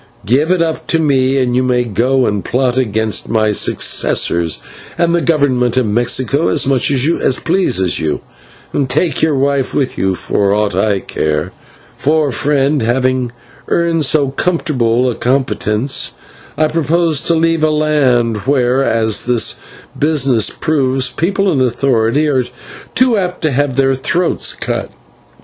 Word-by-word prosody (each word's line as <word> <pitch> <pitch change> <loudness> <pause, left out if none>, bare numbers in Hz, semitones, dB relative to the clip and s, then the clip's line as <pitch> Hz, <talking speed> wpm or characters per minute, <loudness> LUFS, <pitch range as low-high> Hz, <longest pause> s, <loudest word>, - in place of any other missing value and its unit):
Give 135 +9 +1
it 180 -2 +2
up 160 -1 -4
to 165 - +2
me, 135 -4 +1
and 125 -2 0
you 130 - +2
may 125 -1 +1
go 125 +4 0
and 105 -2 -1
plot 125 -1 0
against 110 -4 -1
my 110 -1 +1
successors 85 -4 +1 0.4
and 170 0 +1
the 170 - +1
Government 130 -7 +1
of 130 - +2
Mexico 120 +7 0
as - - +1
much 135 -2 +1
as 140 -1 +1
pleases 160 - 0
you, 80 -2 -2 0.5
and 135 -3 -1
take 150 +3 0
your 155 -2 +2
wife 140 0 0
with 135 -3 -1
you 95 0 0
for 100 +2 0
aught 105 -1 0
I 100 -3 0
care; 75 -1 -2 0.4
for, 150 0 +1
friend, 145 +1 +1
having 125 +1 0 0.4
earned 170 -2 +1
so 145 -1 +2
comfortable 130 -7 0
a 125 - 0
competence, 125 -1 -1 0.4
I 155 +1 +2
propose 160 -1 0
to 170 - +3
leave 165 0 +1
a 155 - +4
land 140 -7 +1
where, 130 -1 +2
as 110 -4 0
this 120 -2 +1 0.4
business 135 -7 +2
proves, 135 -5 0
people 190 +7 0
in 140 -5 0
authority 125 +2 +1
are 130 -4 +1 0.5
too 255 -3 +3
apt 180 -2 -3
to 155 - +1
have 140 0 -1
their 135 0 +2
throats 170 +7 -1
cut. - - -4
135 Hz, 150 wpm, -14 LUFS, 120-155 Hz, 0.5 s, a